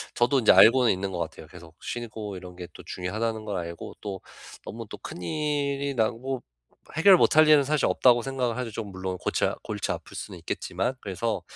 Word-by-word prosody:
저도 130 +3 +3
이제 115 - +6
알고는 125 +1 +7
있는 95 +1 -3
것 90 - -4
같아요. 80 -1 -6
계속 85 -2 -14
'쉬고 110 -4 -5
이런 90 -1 -10
게 90 -1 -8
또 - - -11
중요하다.'는 110 +5 -3
걸 105 -3 -3
알고 85 -1 -6
또 95 -2 -6 0.4
'너무 - - -7
또 - - -8
큰일이 140 - -2
나고 120 +3 -1 0.6
해결 195 +3 +8
못 155 - +3
할 155 0 +8
일은 150 -2 +7
사실 150 +2 +1
없다.'고 120 -2 +4
생각을 125 -2 -2
하죠. 125 -3 -3
좀 105 -2 -6
물론 95 -1 -4
골치 - - 0 0.2
골치 - - -3
아플 - - -7
수는 - - -7
있겠지만. 95 +9 -3
그래서 105 +3 -2
115 Hz, 375 characters per minute, -26 LUFS, 95-135 Hz, 0.6 s, 해결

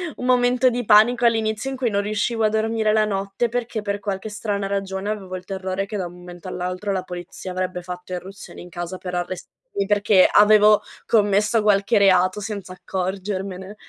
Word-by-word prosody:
un 250 - -6
momento 250 0 +3
di 245 -1 -3
panico 230 +3 +5
all'inizio 225 +2 +1
in 270 - -4
cui 250 -3 0
non 200 -1 0
riuscivo 215 +2 -1
a 215 - +4
dormire 220 0 +1
la 215 0 +4
notte 200 +3 -1
perché 235 -2 -3
per 200 0 -3
qualche 200 +1 -4
strana 205 -2 -3
ragione 195 0 -3
avevo 195 -3 -4
il 185 - -7
terrore 190 0 -3
che 210 +1 -5
da 190 - -2
un 175 - -8
momento 175 0 -11
all'altro 185 +2 -3
la 185 -1 -2
polizia 180 +1 -8
avrebbe 185 0 -3
fatto 180 +1 -8
irruzione 190 +3 -8
in 180 - -11
casa 175 +1 -6
per 180 -1 -6
arrestarmi 185 - -5
perché 205 -2 +4
avevo 210 0 +6 0.2
commesso 210 +1 +2
qualche 205 +1 +3
reato 185 -1 +4
senza 205 -2 -6
accorgermene. 190 +1 -4
200 Hz, 180 wpm, -22 LUFS, 185-215 Hz, 0.2 s, avevo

